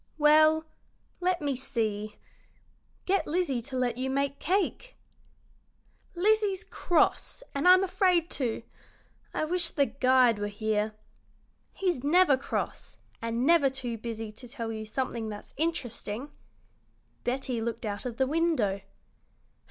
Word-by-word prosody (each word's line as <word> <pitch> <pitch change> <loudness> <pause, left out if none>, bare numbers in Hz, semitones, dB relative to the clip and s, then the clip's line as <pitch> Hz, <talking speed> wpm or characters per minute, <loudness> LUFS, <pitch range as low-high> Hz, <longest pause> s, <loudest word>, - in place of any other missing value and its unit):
"Well, 310 +1 +5 0.5
let 360 -3 0
me 280 -2 0
see 215 -4 -2 0.9
get 390 +1 +1
Lizzie 300 -7 0
to 260 +3 -6
let 245 -2 0
you 260 +1 -1
make 275 +1 -1
cake." 400 +7 -1 1.2
"Lizzie's 405 +1 +2
cross, 355 +7 +1
and 280 +5 +1
I'm 370 +1 +8
afraid 365 -3 +2
to. 245 -6 -2 0.7
I - - -1
wish 350 +2 0
the 280 - +2
guide 255 -4 +3
were 205 - -1
here. 215 +1 -1 0.8
He's 355 -9 -1
never 320 0 +5
cross, 260 - -4 0.2
and 230 +2 -1
never 325 -3 +5
too 260 -3 -4
busy 225 -1 -5
to 245 +4 -12
tell 230 -2 -5
you 220 -1 -5
something 230 -1 -3
that's 205 -1 -9
interesting." 270 -5 -3 0.9
Betty 250 -1 -1
looked 230 0 -3
out 205 -1 -3
of 240 -2 -5
the 265 - +3
window. 280 - +1
265 Hz, 130 wpm, -29 LUFS, 230-335 Hz, 1.2 s, I'm